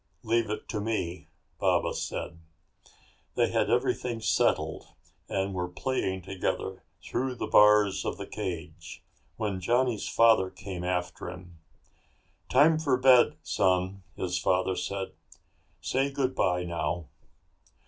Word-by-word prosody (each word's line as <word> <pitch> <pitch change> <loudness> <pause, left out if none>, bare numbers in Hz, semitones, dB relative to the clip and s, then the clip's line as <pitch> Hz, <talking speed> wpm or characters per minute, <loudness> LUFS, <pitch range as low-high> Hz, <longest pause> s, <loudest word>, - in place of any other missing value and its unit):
"Leave 115 -1 +1
it 105 - -4
to 105 - -3
me," 100 -5 -3 0.3
Baba - - +2
said. 85 - -5 1.0
They - - +2
had - - +1
everything 120 -2 0
settled 110 - +1 0.4
and 95 0 -1
were 90 -1 -2
playing 95 -1 -2
together 95 0 -3 0.2
through 130 +1 -2
the - - -3
bars 105 -2 +5
of - - -3
the - - -6
cage 85 -2 -6 0.3
when 100 -3 -2
Johnny's 120 +2 +1
father 115 -5 +4
came 95 -2 -7
after 90 -1 -2
him. 90 -2 -11 0.9
"Time 155 +4 +5
for 140 -5 +2
bed, 130 -1 +5
son," 95 0 +1
his 90 -1 -2
father 95 0 +1
said. 95 0 -3 0.7
"Say 135 +1 0
goodbye, 130 -10 0
now." 85 -1 -2
95 Hz, 120 wpm, -28 LUFS, 90-115 Hz, 1.0 s, bars